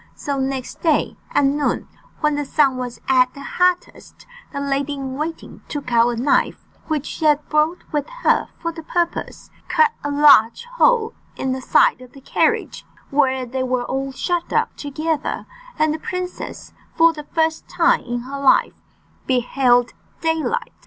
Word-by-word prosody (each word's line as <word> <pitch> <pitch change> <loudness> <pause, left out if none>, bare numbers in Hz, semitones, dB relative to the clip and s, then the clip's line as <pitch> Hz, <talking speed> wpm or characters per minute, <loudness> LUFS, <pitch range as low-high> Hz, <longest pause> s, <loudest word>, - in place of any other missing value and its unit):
So 280 -1 -3
next 265 -1 -3
day, 320 -3 +1
at 285 - +2
noon, 285 +1 0 0.3
when 300 -1 +2
the 290 0 -1
sun 275 -2 +2
was 250 -1 -5
at 255 -1 +4
the 280 - -9
hottest, 360 +3 -1 0.3
the 280 - -4
lady 280 +1 -1
in 270 -2 -5
waiting 315 +3 -6
took 285 -4 -5
out 235 0 +4
a 240 - -2
knife, 250 +5 +1 0.2
which 305 -3 -1
she 315 - -4
had 300 -1 +3
brought 305 +3 +1
with 295 -2 -2
her - - +3
for 335 - -3
the 325 0 -9
purpose, 340 +2 -3 0.2
cut 465 -1 +3
a 290 - -2
large 285 - +5
hole 485 -2 +2 0.2
in 265 - -2
the 260 0 -3
side 255 - +3
of 250 -1 -14
the 275 - -14
carriage - - 0 0.3
where 265 -2 +2
they 260 +2 -3
were 255 -1 -1
all 270 +1 -3
shut 345 +5 -2
up - - 0
together, 305 +1 -3 0.3
and 310 0 +2
the 315 - -4
princess, 365 +2 -6 0.2
for 330 0 +5
the 300 -2 -9
first 320 0 0
time 340 0 +3
in 240 0 -4
her 275 +3 -6
life, 275 -1 +4 0.5
beheld 245 -1 +2 0.3
daylight. 325 +9 -1
285 Hz, 165 wpm, -21 LUFS, 260-320 Hz, 0.5 s, large